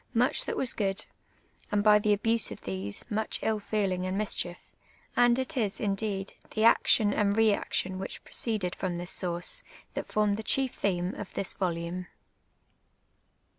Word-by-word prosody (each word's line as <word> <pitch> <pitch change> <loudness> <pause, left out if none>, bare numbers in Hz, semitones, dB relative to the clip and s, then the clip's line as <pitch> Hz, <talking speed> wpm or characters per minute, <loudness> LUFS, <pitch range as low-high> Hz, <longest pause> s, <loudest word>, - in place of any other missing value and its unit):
niucli 245 +3 +2
that - - -3
was 260 - 0
^ood, 195 -2 -1 0.7
and 205 -1 +2
by 210 0 +7
the 210 0 +1
abuse 225 +2 +3
of - - -8
tliese, 95 +1 -3
much 215 +1 0
ill 220 -1 +1
feeling 200 -3 -1
and 185 +1 -2
mischief; 185 -4 -1 0.4
and 240 0 +5
it 260 +3 -2
is, 215 -6 0
indeed, 195 -1 -1 0.2
the 215 - +1
action 215 -2 +5
and 200 0 +1
reaction 200 -3 +2
which 195 - -6
proceeded 210 -6 -2
from 180 -2 -3
this 175 +1 -3
source, 175 - -1 0.3
that - - -4
foriu 210 -1 +2
the 220 - -4
chief 265 +3 +1
theme 180 -2 -1
of 205 - -7
this 195 - 0
volume. 175 0 -3
205 Hz, 160 wpm, -29 LUFS, 185-220 Hz, 0.7 s, by